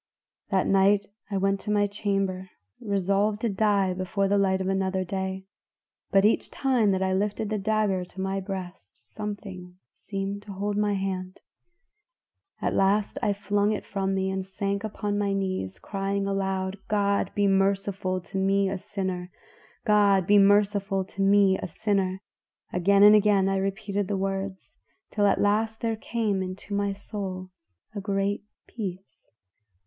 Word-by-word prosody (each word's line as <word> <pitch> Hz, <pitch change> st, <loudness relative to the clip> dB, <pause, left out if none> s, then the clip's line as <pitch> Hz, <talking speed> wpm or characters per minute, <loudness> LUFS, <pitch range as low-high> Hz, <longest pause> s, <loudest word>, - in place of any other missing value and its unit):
"That 190 Hz, -1 st, +2 dB
night 195 Hz, +1 st, +4 dB, 0.2 s
I 200 Hz, -, -1 dB
went 195 Hz, +1 st, +1 dB
to 210 Hz, -, -4 dB
my 205 Hz, -1 st, +3 dB
chamber 195 Hz, -2 st, -2 dB, 0.3 s
resolved 200 Hz, 0 st, 0 dB
to 235 Hz, -, +1 dB
die 200 Hz, -2 st, +2 dB
before 190 Hz, +2 st, -1 dB
the 200 Hz, +1 st, +2 dB
light 190 Hz, -1 st, +2 dB
of 190 Hz, -, -2 dB
another 190 Hz, -1 st, 0 dB
day, 190 Hz, +1 st, -4 dB, 0.6 s
but 195 Hz, 0 st, +4 dB
each 215 Hz, -, +2 dB
time 255 Hz, -6 st, +2 dB
that 190 Hz, -1 st, +1 dB
I 190 Hz, 0 st, +1 dB
lifted 205 Hz, +2 st, -1 dB
the 215 Hz, -, 0 dB
dagger 205 Hz, -2 st, +1 dB
to 180 Hz, -, -13 dB
my 190 Hz, +1 st, -1 dB
breast 185 Hz, -, -7 dB, 0.2 s
something 195 Hz, -4 st, -6 dB, 0.2 s
seemed 195 Hz, 0 st, -5 dB
to 205 Hz, -1 st, -9 dB
hold 205 Hz, +2 st, -2 dB
my 205 Hz, 0 st, +1 dB
hand. 185 Hz, -1 st, -4 dB, 1.2 s
At -, -, +1 dB
last 200 Hz, +2 st, +2 dB
I -, -, +2 dB
flung 205 Hz, +1 st, +1 dB
it 210 Hz, -, -4 dB
from 195 Hz, -1 st, -1 dB
me 190 Hz, 0 st, 0 dB
and 190 Hz, 0 st, -2 dB
sank 200 Hz, +1 st, -3 dB
upon 205 Hz, -1 st, -2 dB
my 200 Hz, -1 st, 0 dB
knees, 185 Hz, -, -2 dB
crying 195 Hz, 0 st, -2 dB
aloud, 190 Hz, -1 st, -2 dB
'God 200 Hz, -1 st, +1 dB
be 205 Hz, -, +2 dB
merciful 195 Hz, -1 st, +1 dB
to 190 Hz, +3 st, -5 dB
me 195 Hz, 0 st, +2 dB
a 195 Hz, -, -3 dB
sinner! 185 Hz, -2 st, -4 dB, 0.6 s
God 205 Hz, -4 st, +4 dB
be 205 Hz, +2 st, +6 dB
merciful 200 Hz, -1 st, +3 dB
to 195 Hz, -, -6 dB
me 195 Hz, -1 st, +4 dB
a -, -, -4 dB
sinner!' 190 Hz, 0 st, -1 dB, 0.5 s
Again 195 Hz, +3 st, +4 dB
and 210 Hz, 0 st, +9 dB
again 205 Hz, -2 st, +4 dB
I 195 Hz, 0 st, +1 dB
repeated 195 Hz, +1 st, -2 dB
the 200 Hz, -, -1 dB
words 195 Hz, 0 st, -4 dB, 0.3 s
till 205 Hz, -1 st, +2 dB
at 200 Hz, -, +2 dB
last 220 Hz, +2 st, +1 dB
there 225 Hz, -1 st, 0 dB
came 215 Hz, -3 st, -1 dB
into 185 Hz, +2 st, -6 dB
my 200 Hz, 0 st, 0 dB
soul 190 Hz, -2 st, -6 dB, 0.4 s
a 205 Hz, -, -4 dB
great 200 Hz, 0 st, -1 dB, 0.2 s
peace. 195 Hz, -4 st, -7 dB
195 Hz, 160 wpm, -26 LUFS, 190-205 Hz, 1.2 s, and